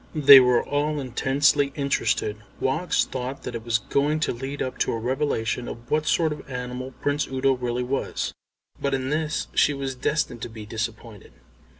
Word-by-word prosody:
They 140 -2 +10
were 125 -1 +3
all 145 +1 0
intensely 140 +2 +2
interested. 115 -6 0 0.2
Woggs 155 +7 +1
thought 130 +1 -5
that 125 - -5
it 115 -1 -5
was 115 -1 +2
going 145 +7 0
to - - +1
lead 135 +4 -6
up 130 - -3
to - - +1
a - - -1
revelation 125 -1 -1
of 120 +1 -9
what 155 0 +1
sort 160 -3 +2
of 150 - -11
animal 125 0 -5
Prince 145 +1 0
Udo 135 +1 +1
really 125 -1 -2
was, 135 +2 -2 0.5
but 140 -1 +1
in 130 +1 -3
this 155 0 -1
she 145 - +3
was 135 -1 -3
destined 125 -2 -1
to - - -5
be 110 -1 -9
disappointed. 110 -1 -6
130 Hz, 180 wpm, -24 LUFS, 120-145 Hz, 0.5 s, They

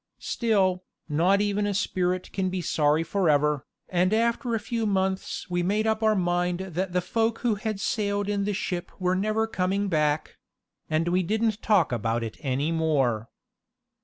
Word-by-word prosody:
Still, 190 -6 +1 0.2
not 175 +6 +3
even 205 0 0
a 200 - -1
spirit 185 -2 -1
can 190 -1 0
be 185 0 -2
sorry 155 -2 +2
forever, 150 -5 +1 0.2
and 180 +1 +1
after 235 +1 +1
a - - 0
few 225 +1 -2
months 190 -1 -1
we 175 0 -1
made 205 +5 +1
up 220 0 +1
our 220 -1 +3
mind 175 -1 0
that 190 0 -3
the 180 - +2
folk 225 +4 0
who 235 - +4
had 210 0 -3
sailed 205 -3 -1
in 205 -1 0
the 205 +1 -1
ship 180 -3 -3
were 180 0 +1
never 215 +3 +1
coming 195 -1 -1
back; 150 -2 0 0.5
and 160 +2 +1
we 180 +1 +2
didn't 220 +3 0
talk 205 -9 +3
about 115 0 -1
it 110 - -6
any 140 +3 -1
more. 135 -9 +1
185 Hz, 170 wpm, -26 LUFS, 165-210 Hz, 0.5 s, who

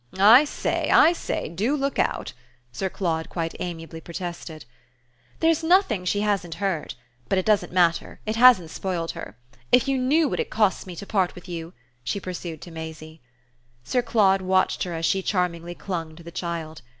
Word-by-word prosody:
"I 225 +9 +8
say, - - -2
I 335 - +6
say: - - -3
DO 215 - -1
look 275 0 -2
out!" - - -1 0.4
Sir 190 +10 -3
Claude 165 -4 -2
quite 165 -2 -3
amiably 165 -2 -6
protested. 170 -3 -7 0.8
"There's 325 0 +3
nothing 320 - +3
she 205 +3 0
hasn't 195 -5 -1
heard. 185 -4 -2 0.3
But 195 - +2
it 185 - 0
doesn't 215 -2 +2
matter 175 -2 +1
it 215 0 -2
hasn't 230 -9 +6
spoiled 175 -3 -3
her. 105 - -9 0.3
If 250 0 +5
you 270 -1 +1
knew 295 +5 +3
what - - -3
it - - -2
costs 210 -3 +1
me 180 - -7
to 200 - -8
part 190 -3 0
with 180 0 -12
you!" 170 -1 -6 0.3
she 200 - -2
pursued 175 -4 -6
to 175 - -10
Maisie. 160 -1 -9 0.6
Sir 250 - 0
Claude 195 -5 +3
watched 185 0 +1
her 175 -2 -4
as 165 0 -2
she 190 +3 +1
charmingly 175 -3 -2
clung 165 -5 -5
to 170 - -13
the 170 - -10
child. 165 -3 -5
180 Hz, 180 wpm, -24 LUFS, 165-210 Hz, 0.8 s, I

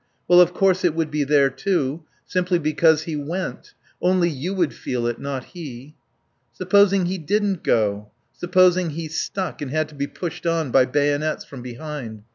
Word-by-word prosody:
Well, 180 0 +7
of 175 0 +4
course 185 0 +2
it 170 -3 +2
would 160 -2 -1
be 150 -1 0
there 140 -1 +3
too, 150 0 -1 0.2
simply 180 -1 0
because 155 0 +3
he 160 -1 -4
went; 165 +6 -5 0.3
only 180 -1 +2
you 150 +6 -4
would 175 -6 0
feel 120 -2 -3
it, 120 -1 -2
not 135 -2 -4
he. 145 -5 -9 0.6
Supposing 200 -2 +3
he 185 +1 -2
didn't 200 +3 0
go, 105 -2 0 0.2
supposing 180 0 +3
he 160 +1 -5
stuck, 180 +4 -4
and 145 - -4
had 155 +2 0
to - - -15
be 140 0 -2
pushed 175 +1 -6
on, 165 -5 0
by 130 +1 +5
bayonets, 145 +3 0
from 135 -3 -10
behind? 120 -3 -7
155 Hz, 175 wpm, -22 LUFS, 140-180 Hz, 0.6 s, Well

